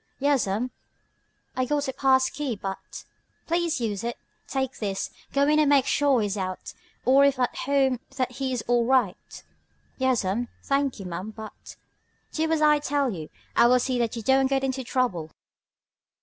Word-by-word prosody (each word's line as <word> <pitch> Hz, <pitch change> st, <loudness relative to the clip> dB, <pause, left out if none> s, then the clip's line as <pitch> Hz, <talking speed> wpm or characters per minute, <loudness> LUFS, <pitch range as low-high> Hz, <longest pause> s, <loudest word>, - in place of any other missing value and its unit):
"Yas'm, 250 Hz, -4 st, +1 dB, 0.8 s
I 255 Hz, -, +1 dB
got 290 Hz, +1 st, 0 dB
a 265 Hz, -, -2 dB
pass 260 Hz, -1 st, +3 dB
key, 280 Hz, -5 st, -3 dB
but 195 Hz, -1 st, -7 dB, 0.2 s
" -, -, -43 dB
"Please 335 Hz, -2 st, 0 dB
use 215 Hz, -4 st, -2 dB
it. 235 Hz, 0 st, -3 dB, 0.3 s
Take 265 Hz, -1 st, -2 dB
this. 195 Hz, -3 st, -3 dB, 0.2 s
Go 280 Hz, 0 st, +2 dB
in 305 Hz, +1 st, +4 dB
and 300 Hz, -2 st, +4 dB
make 280 Hz, -2 st, +5 dB
sure 275 Hz, -4 st, +3 dB
he -, -, +1 dB
is 205 Hz, 0 st, -2 dB
out, 185 Hz, -1 st, -4 dB, 0.3 s
or 270 Hz, +3 st, +6 dB
if 280 Hz, -1 st, +3 dB
at 250 Hz, -1 st, 0 dB
home 270 Hz, -2 st, +1 dB, 0.2 s
that 255 Hz, -1 st, 0 dB
he 260 Hz, +1 st, -3 dB
is 245 Hz, -4 st, -2 dB
all 240 Hz, -1 st, +3 dB
right." 250 Hz, -8 st, 0 dB, 0.6 s
"Yas'm, 240 Hz, -3 st, +1 dB, 0.2 s
thanky 275 Hz, -6 st, 0 dB
ma'am, 180 Hz, +3 st, -5 dB
but 220 Hz, 0 st, -10 dB, 0.3 s
" -, -, -43 dB
"Do 320 Hz, 0 st, 0 dB
as 315 Hz, -1 st, +2 dB
I 300 Hz, -1 st, +5 dB
tell 285 Hz, -3 st, 0 dB
you. 160 Hz, -6 st, -7 dB, 0.3 s
I 235 Hz, -, +6 dB
will 250 Hz, +1 st, +5 dB
see 250 Hz, 0 st, -1 dB
that 235 Hz, -1 st, 0 dB
you 230 Hz, -, -5 dB
don't 265 Hz, +3 st, +4 dB
get 270 Hz, 0 st, 0 dB
into 265 Hz, 0 st, -1 dB
trouble." 235 Hz, -11 st, -1 dB
255 Hz, 180 wpm, -26 LUFS, 225-275 Hz, 0.8 s, or